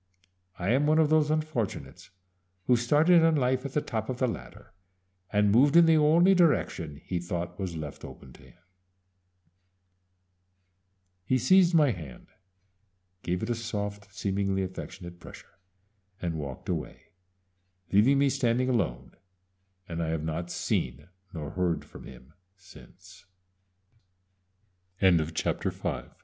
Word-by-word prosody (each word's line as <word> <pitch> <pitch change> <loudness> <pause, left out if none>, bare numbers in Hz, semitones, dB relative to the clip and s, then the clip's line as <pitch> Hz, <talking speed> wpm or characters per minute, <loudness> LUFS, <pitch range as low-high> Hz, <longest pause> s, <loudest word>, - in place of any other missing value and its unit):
_I 90 +4 -1
am 140 +4 +2
one 155 +1 +3
of 155 -1 +3
those 155 -1 +3
unfortunates 110 - -3 0.6
who 125 - +4
started 150 +9 +4
in 165 -1 +4
life 130 -1 0
at 135 - -13
the 150 - 0
top 110 0 -4
of 130 - -3
the 130 - +1
ladder 115 - -8 0.6
and 105 -1 +3
moved 140 +7 +4
in 170 - +8
the 165 -1 +5
only 165 +5 +5
direction 125 - +1
he 90 - -2
thought 85 +1 -5
was 95 -3 -4
left 75 -2 -7
open 65 - -11
to - - -17
him._" - - -19 2.7
He 130 +8 +1
seized 180 +6 +4
my 150 -5 +5
hand, 75 - -10 0.9
gave 90 +3 -2
it 110 - -3
a - - +2
soft, 105 -3 -5
seemingly 100 -1 -1
affectionate 90 -1 -8
pressure, 90 - -14 0.6
and 85 -4 -3
walked 70 -5 -7
away, - - -5 0.8
leaving 115 +8 +4
me 140 0 +3
standing 125 0 0
alone, 65 - -1 0.8
and 85 -1 -4
I 80 - -2
have 80 -1 -2
not 80 +2 -4
see 60 -7 -2
110 Hz, 120 wpm, -28 LUFS, 90-145 Hz, 2.7 s, in